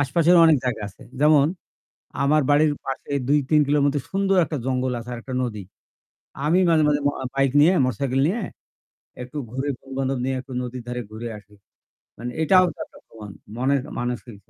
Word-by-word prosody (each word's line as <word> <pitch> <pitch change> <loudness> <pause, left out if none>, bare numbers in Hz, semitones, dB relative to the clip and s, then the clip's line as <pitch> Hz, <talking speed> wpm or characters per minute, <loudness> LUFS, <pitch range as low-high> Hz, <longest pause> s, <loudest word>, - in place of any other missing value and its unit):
আশপাশেরও 170 +5 +4
অনেক 160 -2 +5
জায়গা 115 -4 -2
আছে। 100 - -17 0.2
যেমন 150 -1 +5 0.8
আমার 150 +2 +3
বাড়ির 150 +1 +4
পাশে 135 +1 -5 0.2
২ 150 - +4
৩ 155 -1 +5
কিলোর 145 0 +2
মতো 145 0 +1
সুন্দর 195 0 +1
একটা 155 0 -4
জঙ্গল 130 -1 0
আছে 120 +1 -8
আর - - -6
একটা 130 +1 -6
নদী। 105 -5 -4 0.8
আমি 170 +5 +3
মাঝে, 160 -2 +4
মাঝে 145 -1 +2
ম - - +4
অ - - -4
বাইক 135 -1 +2
নিয়ে 170 +5 +5
মোটরসাইকেল 135 +1 -1
নিয়ে 205 +8 -1 0.8
একটু 125 +4 -10
ঘুরে 135 +4 -3
বন্ধু-বান্ধব 135 -1 -3
নিয়ে 130 0 -1
একটু 130 +1 -12
নদীর 125 0 -6
ধারে 125 0 -4
ঘুরে 115 +2 -6
আসি। 105 0 -20 0.6
মানে 120 +2 -5
এটাও 185 +3 +5
তো - - -25
একটা - - -19
ভ্রমন 105 -3 -11 0.3
মনে 135 +3 +2 0.2
মানসিক 120 -2 -4
স - - -35
135 Hz, 185 wpm, -23 LUFS, 125-150 Hz, 0.8 s, অনেক